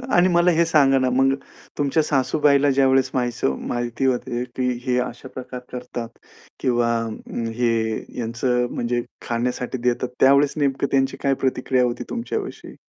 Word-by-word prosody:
आणि 175 +1 +5
मला 175 0 +4
हे 170 +1 +3
सांगा 140 -4 +4
ना, 130 0 +1
मग 135 +2 +3 0.4
तुमच्या 145 +2 +2
सासूबाईला 145 0 +3
ज्यावेळेस 135 -1 +3
माहीसव 120 - 0
माहिती 120 +1 -2
होते 125 -1 0
की 125 -1 0 0.2
हे 125 -1 +1
अशा 125 0 -5
प्रकार 125 -1 -7
करतात 120 -2 -6 0.5
किंवा 120 -2 +1
अ, 110 -1 -8 0.2
हे 120 -1 +2 0.5
यांचं 125 +1 0
म्हणजे 120 0 -1 0.3
खाण्यासाठी 125 +2 -2
देतात, 125 +1 0
त्यावेळेस 140 +1 +5
नेमकं 140 -1 +1
त्यांची 135 -1 +1
काय 140 - +3
प्रतिक्रिया 130 0 +1
होती 120 0 -1
तुमच्याविषयी? 315 - -5
130 Hz, 145 wpm, -22 LUFS, 120-140 Hz, 0.5 s, आणि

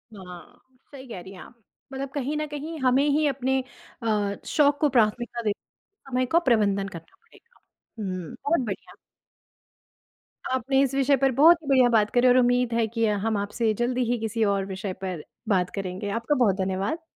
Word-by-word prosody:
हाँ, 180 -2 -12 0.3
सही 270 -2 -11
कह 225 - -7
रही 190 +2 -11
हैं 185 - -12
आप। - - -14 0.4
मतलब 270 0 -4
कहीं 285 +1 -2
न 305 - -1
कहीं 300 +2 -6
हमें 260 +2 +3
ही 300 +2 +2
अपने 265 -1 0 0.4
अ, 205 -2 0
शौक 290 -2 +2
को 300 - +3
प्राथमिकता 240 0 +1
देते 210 -3 -2 0.5
समय 255 0 +1
का 335 - +6
प्रबंधन 200 -4 +2
करना 165 -3 -12
पड़ेगा। 470 +1 -25 0.4
हुँ। 185 -5 -5
बहुत 310 +1 +2
बढ़िया। 195 -3 -6 1.6
आपने 265 +1 +1
इस 270 -1 +1
विषय 275 +1 +3
पर 270 0 +2
बहुत 320 +7 +6
ही - - -11
बढ़िया 260 -3 +5
बात 215 -3 +3
करी 245 +1 +4
और 250 0 +5
उम्मीद 245 -1 +2
है 230 -1 +2
कि 230 +1 -1 0.2
हम 220 -2 +1
आपसे 215 +2 -1
जल्दी 250 +1 +1
ही 245 - +1
किसी 225 0 -1
और 195 -1 -1
विषय 190 0 -5
पर 180 -5 -4 0.3
बात 180 -3 +2
करेंगे। 195 +1 -4
आपका 260 +6 0
बहुत 230 -7 +3
धन्यवाद। 195 - -2
240 Hz, 180 wpm, -25 LUFS, 200-270 Hz, 1.6 s, का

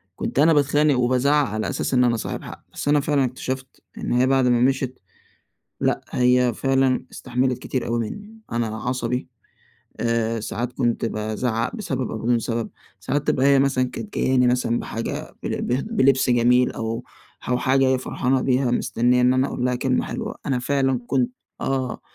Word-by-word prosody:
كنت - - -3
أنا 160 +2 +6
باتخانق 145 -1 +3
وبازعِّق 130 +4 +2
على 110 +1 -3
أساس 135 - -2
إن 125 0 +4
أنا 120 -2 +2
صاحب - - -5
حق. - - -10
بس - - -5
أنا 145 0 +4
فعلًا 145 -2 +1
اكتشفت 130 +1 -5 0.2
إن - - -4
هي، 125 +2 +3
بعد 135 -1 +3
ما 120 -1 +3
مشيت، 130 0 0 0.8
لأ، - - +1
هي 125 -1 +3
فعلًا 135 0 +1
استحملت 125 0 -1
كتير 130 -3 -3
أوي 115 0 0
مني. 210 +2 -10
أنا 115 -1 0
عصبي، 125 +1 -2 0.7
آآ 115 -1 0
ساعات 120 +3 -4
كنت 120 -3 0
بازعِّق 110 - -2
بسبب 135 - -3
أو - - -3
بدون 120 +1 +1
سبب. 115 0 -3 0.3
ساعات 145 0 -2
تبقى 130 - +2
هي 140 -1 +5
مثلًا 135 -2 +2
كانت 210 - -8
جاياني 125 -1 +3
مثلًا 125 -1 +1
بحاجة، 115 +1 -5
بلب - - -2
بل 125 +3 +1
بلبس 135 - +2
جميل، 125 +1 +4
أو 115 0 -4 0.5
أو 125 - +2
حاجة 135 +2 +2
هي - - +4
جاية 130 0 +3
فرحانة 130 0 0
بيها، 130 -1 +1
مستنية 125 +1 +2
إن 125 +1 +4
أنا 130 +2 +2
أقول 125 - -3
لها 125 0 +1
كلمة 125 0 0
حلوة. - - -5
أنا 135 -3 0
فعلًا 135 -1 +1
كنت 125 -2 +1 0.3
آه، 130 -2 -2
125 Hz, 180 wpm, -23 LUFS, 120-135 Hz, 0.8 s, أنا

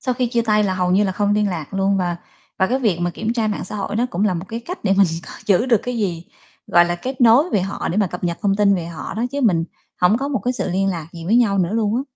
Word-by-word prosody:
Sau 255 -3 -1
khi 250 0 0
chia 235 0 0
tay 210 -2 +2
là 190 -2 0
hầu 180 -1 0
như 195 +3 +3
là 190 - -1
không 205 +2 0
liên 210 -1 +1
lạc 170 -3 -5
luôn 195 0 +1
và 175 -2 -1 0.4
và 190 - +3
cái 255 +6 0
việc 215 -10 +1
mà 175 0 0
kiểm 215 +6 -3
tra 230 -2 0
mạng 210 - -3
xã - - -6
hội 205 +1 -3
nó 240 +2 +1
cũng 180 +4 -1
là 200 -4 +1
một 170 +1 -4
cái 230 +1 -5
cách 355 - -8
để 195 - +3
mình 200 -1 +6 0.2
coi - - -10
giữ 205 +4 +3
được 235 -4 +4
cái 250 -1 -3
gì, 175 -6 -2 0.4
gọi 175 - +5
là, 175 0 -1
kết 255 +9 -6
nối 245 +8 +5
về 205 - +2
họ 195 +2 -3
để 175 - -2
mà 210 -2 +3
cập 180 0 -6
nhật 170 -1 -2
thông 200 -2 +2
tin 200 -1 +4
về 170 -3 -3
họ 170 +1 -7
đó, 225 +3 -1
chứ 285 - -2
mình 180 -10 +2 0.4
hổng 180 +5 +4
có 275 +1 -2
một 270 - -1
cái 250 - +1
sự 240 - -3
liên 195 +2 +1
lạc 165 -4 -4
gì 165 -1 -9
với 215 +7 +2
nhau 205 -5 +3
nữa 180 +1 +1
luôn 220 -1 +1
á. 260 - 0
200 Hz, 320 wpm, -20 LUFS, 180-230 Hz, 0.4 s, mình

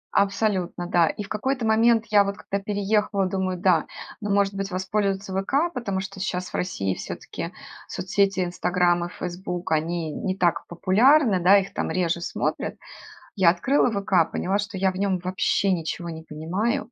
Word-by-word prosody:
Абсолютно, 195 -3 +1
да. 175 -2 +3
И 210 - -3
в 195 - -11
какой-то 250 +2 -1
момент 225 +1 +4
я 205 -1 +6
вот 200 0 -4
когда 200 - -3
переехала, 205 -1 0
думаю: 185 -1 -1
"Да, 180 -4 +3 0.3
ну, 210 - -3
может 200 0 +2
быть, 195 0 -3
воспользоваться 195 +1 -1
'ВК', 275 - 0
потому 200 -6 -2
что 195 0 -8
щас 180 -1 -3
в - - -3
России 95 - -1
всё-таки - - -6 0.4
соцсети 195 0 0
'Инстаграм' 175 0 +1
и 175 - -6
'Фейсбук' 180 -1 -5
они 160 +1 0
не 185 +5 -3
так 175 -1 +1
популярны, 215 - +4
да, 195 +3 +7
их 195 0 -2
там - - -2
реже 170 -2 0
смотрят". - - -2 0.6
Я 190 -4 +5
открыла 250 +11 +2
"ВК", 195 -5 +1
поняла, 195 +3 0
что 200 -1 -4
я 190 0 +2
в 185 - -8
нём 195 -2 +1
вообще 185 +2 0
ничего 170 0 -3
не 160 0 -7
понимаю. 180 +10 -2
190 Hz, 170 wpm, -24 LUFS, 175-205 Hz, 0.6 s, да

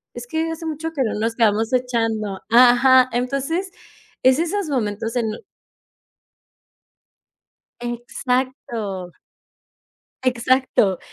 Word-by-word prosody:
es 240 0 -8
que 320 +3 -1
hace 325 0 -6
mucho 320 +1 -4
que 280 - -2
no 220 - -2
nos 225 +1 -1
quedamos 225 +1 +2
echando". 225 -5 -1
Ajá. 250 +2 +6
Entonces 275 +10 -2 0.5
es 260 +2 +5
esos 345 +1 -1
momentos 225 -3 -2
en 235 - +1 2.6
Exacto. 240 - -3 1.1
Exacto, 255 -5 +2
250 Hz, 90 wpm, -21 LUFS, 225-270 Hz, 2.6 s, Ajá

